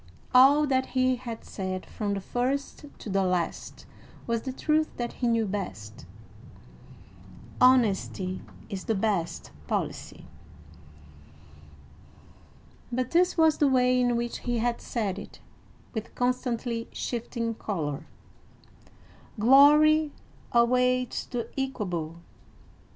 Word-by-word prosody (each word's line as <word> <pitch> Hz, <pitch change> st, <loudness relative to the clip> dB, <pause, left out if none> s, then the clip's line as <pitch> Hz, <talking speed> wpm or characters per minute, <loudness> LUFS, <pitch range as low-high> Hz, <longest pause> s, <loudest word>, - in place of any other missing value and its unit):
All 275 Hz, +4 st, +7 dB
that 260 Hz, -2 st, +1 dB
he 255 Hz, 0 st, +3 dB
had 235 Hz, -2 st, -7 dB
said 185 Hz, -1 st, -5 dB
from 205 Hz, -2 st, -3 dB
the 195 Hz, -, -4 dB
first 260 Hz, +8 st, -2 dB
to -, -, -10 dB
the 195 Hz, -1 st, +1 dB
last 180 Hz, -3 st, -2 dB, 0.4 s
was 230 Hz, -1 st, -1 dB
the 260 Hz, -, -4 dB
truth 310 Hz, +4 st, +1 dB
that 240 Hz, -1 st, -3 dB
he 245 Hz, -, -2 dB
knew 230 Hz, -1 st, +2 dB
best: 110 Hz, -, -6 dB, 1.5 s
"Honesty 205 Hz, -7 st, +3 dB, 0.3 s
is 195 Hz, -4 st, -6 dB
the 225 Hz, -, 0 dB
best 195 Hz, -5 st, -1 dB, 0.2 s
policy;" -, -, -4 dB, 2.7 s
but 255 Hz, +1 st, -2 dB
this 355 Hz, +2 st, +3 dB
was 320 Hz, -1 st, +4 dB
the 290 Hz, -, +4 dB
way 250 Hz, -1 st, +3 dB
in 245 Hz, -1 st, +2 dB
which 235 Hz, 0 st, -2 dB
he 240 Hz, -1 st, -2 dB
had 235 Hz, +1 st, -1 dB
said 205 Hz, -5 st, -2 dB
it, -, -, -11 dB, 0.5 s
with 220 Hz, -2 st, -6 dB
constantly 245 Hz, -2 st, -1 dB
shifting 230 Hz, -1 st, -3 dB
color: 155 Hz, -10 st, -4 dB, 1.3 s
"Glory 295 Hz, +5 st, +6 dB, 0.4 s
awaits 250 Hz, +1 st, +2 dB
the 240 Hz, -2 st, -4 dB
equable! 180 Hz, -12 st, -3 dB
240 Hz, 110 wpm, -27 LUFS, 205-255 Hz, 2.7 s, All